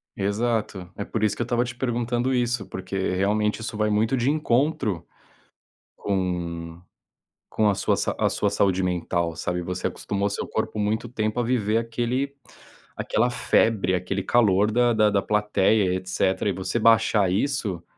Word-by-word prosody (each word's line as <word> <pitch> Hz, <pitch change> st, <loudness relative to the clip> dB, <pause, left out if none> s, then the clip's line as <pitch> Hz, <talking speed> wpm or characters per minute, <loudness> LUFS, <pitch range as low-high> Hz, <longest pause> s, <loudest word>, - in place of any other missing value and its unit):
Exato, 100 Hz, -2 st, -1 dB
é 100 Hz, -, -4 dB
por 110 Hz, +1 st, -3 dB
isso 105 Hz, -, +2 dB
que -, -, -5 dB
eu -, -, +3 dB
estava 120 Hz, +1 st, 0 dB
te 125 Hz, -, -6 dB
perguntando 120 Hz, 0 st, -1 dB
isso, 120 Hz, -4 st, -1 dB
porque 95 Hz, +1 st, -6 dB, 0.2 s
realmente 105 Hz, +3 st, 0 dB
isso 110 Hz, -, -5 dB
vai 105 Hz, 0 st, +1 dB
muito 110 Hz, +5 st, +1 dB
de 125 Hz, +2 st, +1 dB
encontro, 135 Hz, -, 0 dB, 0.9 s
com 85 Hz, -3 st, -3 dB, 0.7 s
com 105 Hz, -1 st, +2 dB
a 100 Hz, -, +1 dB
sua -, -, +1 dB
sa -, -, -1 dB
a -, -, +3 dB
sua -, -, 0 dB
saúde 95 Hz, -2 st, +1 dB
mental, 85 Hz, -2 st, -1 dB
sabe. 90 Hz, +2 st, -2 dB
Você 90 Hz, +1 st, -4 dB
acostumou 100 Hz, 0 st, -2 dB
seu 100 Hz, -, -4 dB
corpo 110 Hz, -1 st, -3 dB
muito 110 Hz, +3 st, -1 dB
tempo 110 Hz, 0 st, -2 dB
a -, -, +1 dB
viver 115 Hz, -3 st, +1 dB
aquele 120 Hz, +4 st, -2 dB, 0.6 s
aquela 120 Hz, +3 st, 0 dB
febre, 110 Hz, -5 st, +2 dB
aquele 90 Hz, +2 st, -2 dB
calor 105 Hz, -3 st, +3 dB
da 120 Hz, +1 st, +3 dB
da 105 Hz, -1 st, +4 dB
da 100 Hz, -1 st, +2 dB
plateia, 105 Hz, -2 st, +2 dB
e -, -, +1 dB
etcétera, 95 Hz, +2 st, 0 dB
e -, -, 0 dB
você 95 Hz, +6 st, -2 dB
baixar 110 Hz, -4 st, +4 dB
isso 100 Hz, -5 st, -1 dB
105 Hz, 165 wpm, -24 LUFS, 95-120 Hz, 0.9 s, da